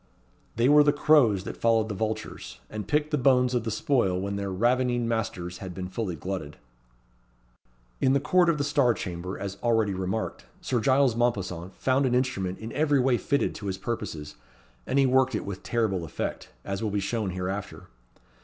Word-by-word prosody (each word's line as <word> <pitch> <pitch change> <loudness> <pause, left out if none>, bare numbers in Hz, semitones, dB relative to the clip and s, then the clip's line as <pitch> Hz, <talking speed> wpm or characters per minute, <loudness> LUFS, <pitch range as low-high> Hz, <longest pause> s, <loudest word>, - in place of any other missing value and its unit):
They 115 +2 +3
were 150 +1 +7
the 145 - +4
crows 145 -10 +4
that - - -6
followed 115 -1 +3
the 105 - -4
vultures, 110 +2 -4
and 105 -2 -5
picked 150 +4 +1
the 150 - +1
bones 125 -1 +3
of 120 -2 0
the - - -1
spoil 110 - +1
when 100 +1 -3
their 100 0 -3
ravening 120 +3 +1
masters 105 -6 -3
had 95 -2 -7
been 95 -1 -4
fully 95 -3 -3
glutted. 90 -3 -5 1.4
In 130 - +3
the 140 - +3
court 180 +4 +3
of 150 -4 +1
Star 140 -5 +3
Chamber, 90 -2 -5
as 100 -1 -6
already 115 -4 +2
remarked, 95 +4 -3
Sir 125 - -1
Giles 130 0 +3
Mompesson 95 -7 -1
found 130 +6 +1
an 125 - +1
instrument 95 -8 -1
in 110 +1 -7
every 145 -2 +2
way 125 -1 +3
fitted 140 - 0
to 100 - -7
his 95 -1 -2
purposes; 80 -10 -5 0.5
and 135 - 0
he 135 - +5
worked 130 -1 +3
it - - -3
with 100 -2 -6
terrible 110 -7 0
effect, 80 - -5 0.2
as 100 0 -3
will 110 - -1
be 100 0 -1
shown 105 +1 -2
hereafter. 95 +2 -4
115 Hz, 185 wpm, -27 LUFS, 95-130 Hz, 1.4 s, were